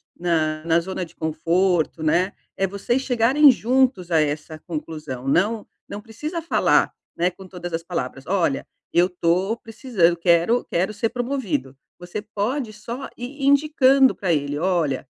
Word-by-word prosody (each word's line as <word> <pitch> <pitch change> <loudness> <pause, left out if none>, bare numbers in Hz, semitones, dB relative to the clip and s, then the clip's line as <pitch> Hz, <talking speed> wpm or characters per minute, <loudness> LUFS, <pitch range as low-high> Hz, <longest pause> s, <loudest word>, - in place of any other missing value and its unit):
na 155 -3 0
na 165 0 +3
zona 185 +2 -4
de 170 -1 -11
conforto, 165 +1 0
né". 175 +5 +2 0.2
É 195 - 0
vocês 200 +7 -1
chegarem 265 +3 +5
juntos 250 -6 +2
a 160 -2 +4
essa 150 +1 -3
conclusão, 150 -6 -6
não 205 +9 +1 0.2
não 205 - -6
precisa 300 - -6
falar, 335 - +2 0.2
né, 175 +2 +2
com 190 +1 -13
todas 175 -2 -7
as 165 - -1
palavras: 135 -6 -5
"Olha, 175 -8 0 0.3
eu 175 +2 +4
tô 180 +4 0
precisan 225 -6 +1
eu 175 - -1
quero 170 +7 +3
quero 185 +5 -1
ser 215 +2 -1
promovido". 230 - -3 0.3
Você 175 +4 -5
pode 220 +4 -3
só 235 +5 -7
ir 270 +4 -7
indicando 275 -2 +4
pra 190 -4 -1
ele: 145 -1 -1
"Olha" 165 -6 0
185 Hz, 155 wpm, -22 LUFS, 165-235 Hz, 0.3 s, chegarem